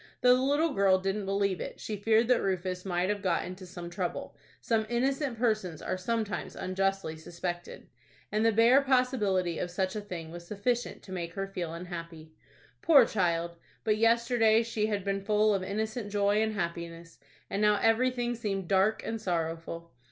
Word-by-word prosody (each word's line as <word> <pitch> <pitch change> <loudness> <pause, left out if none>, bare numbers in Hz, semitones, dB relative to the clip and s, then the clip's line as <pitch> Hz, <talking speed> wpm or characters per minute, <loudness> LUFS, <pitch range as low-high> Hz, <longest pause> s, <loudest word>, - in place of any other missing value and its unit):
Though 250 0 +7
the 255 - 0
little 290 +4 +2
girl 195 -4 +4
didn't 195 +1 -2
believe 195 -1 0
it, - - -6
she 215 - -4
feared 220 +3 +3
that 250 - +4
Rufus 185 -1 -2
might 180 0 0
have 205 -1 -1
got 180 -4 0
into 185 +1 -8
some 175 -1 -8
trouble,—some 200 +4 -3
innocent 265 +1 0
persons 215 -8 0
are - - -2
sometimes 210 0 -3
unjustly 195 -2 -1
suspected,—and 175 +5 -6
the 225 - +5
bare 230 +5 +6
possibility 225 - +1
of 180 - -2
such 185 +2 -2
a 210 - -2
thing 170 -5 -7
was 170 0 -9
sufficient 235 +4 -2
to 190 - -12
make 170 -2 -4
her 195 - -2
feel 180 -4 -5
unhappy. 170 -2 -8 0.5
Poor 285 -7 +7
child! 170 -5 -1 0.3
But 215 -2 +2
yesterday 230 0 +4
she 220 -2 -1
had 205 -3 -2
been 195 0 -1
full 210 +1 +3
of 195 - 0
innocent 215 +2 -3
joy 205 +1 +2
and 220 0 0
happiness, 170 -3 -5 0.3
and 200 - -2
now 210 -1 +4
everything 240 +1 +2
seemed 200 -5 -3
dark 195 +3 +2
and 225 -1 -3
sorrowful. 165 -1 -3
200 Hz, 170 wpm, -29 LUFS, 180-225 Hz, 0.5 s, Though